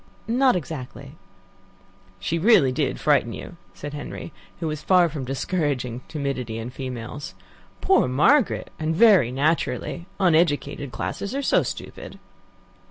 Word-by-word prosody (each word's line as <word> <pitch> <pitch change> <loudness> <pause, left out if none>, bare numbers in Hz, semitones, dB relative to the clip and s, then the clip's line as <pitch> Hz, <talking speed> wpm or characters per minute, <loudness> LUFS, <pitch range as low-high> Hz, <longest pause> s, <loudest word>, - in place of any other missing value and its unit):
"Not 255 +1 +3
exactly." 140 -7 -6 1.1
"She 165 - -1
really 170 - +5
did - - -1
frighten - - +2
you," - - -9 0.2
said 145 0 -7
Henry, 150 +2 -7 0.3
who 170 - -3
was 155 -1 -3
far 180 0 +4
from 145 -5 -5
discouraging 135 -3 -2
timidity 135 -7 -3
in 115 +2 -5
females. 130 +2 -6 0.5
"Poor 380 - +4
Margaret! 185 - +3
And 160 +1 -1
very 190 - +6
naturally. 160 +5 -1
Uneducated 155 -6 +2
classes 200 - -4
are 280 - -1
so - - +3
stupid." - - -7
150 Hz, 125 wpm, -24 LUFS, 130-180 Hz, 1.1 s, very